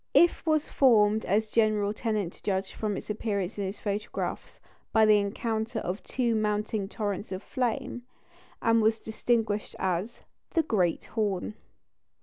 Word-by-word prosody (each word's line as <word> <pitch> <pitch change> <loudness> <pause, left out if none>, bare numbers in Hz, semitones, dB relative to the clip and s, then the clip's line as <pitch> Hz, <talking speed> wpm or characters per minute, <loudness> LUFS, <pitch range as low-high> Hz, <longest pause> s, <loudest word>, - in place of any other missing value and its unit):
If 345 - +5
was 310 -1 +2
formed 220 -5 +4
as 215 +3 +1
General 215 -2 +2
Tennant 215 -5 -2
judged 190 -1 -1
from 210 -3 -2
its - - -5
appearance 205 -2 -2
in 200 - -1
his 190 +2 -4
photographs, 210 0 -4 0.3
by 220 -1 +5
the 215 -1 +6
encounter 220 +3 -2
of 190 -2 -3
two 240 -3 0
mounting 210 -1 0
torrents 205 -2 -3
of 185 +1 -4
flame, 245 -1 -2 0.6
and 230 0 +4
was 220 +1 +3
distinguished 220 -1 -1
as 190 +4 -2 0.3
the 330 - +4
"Great 185 - +1
Horn." 210 -3 -1
215 Hz, 140 wpm, -28 LUFS, 200-225 Hz, 0.6 s, the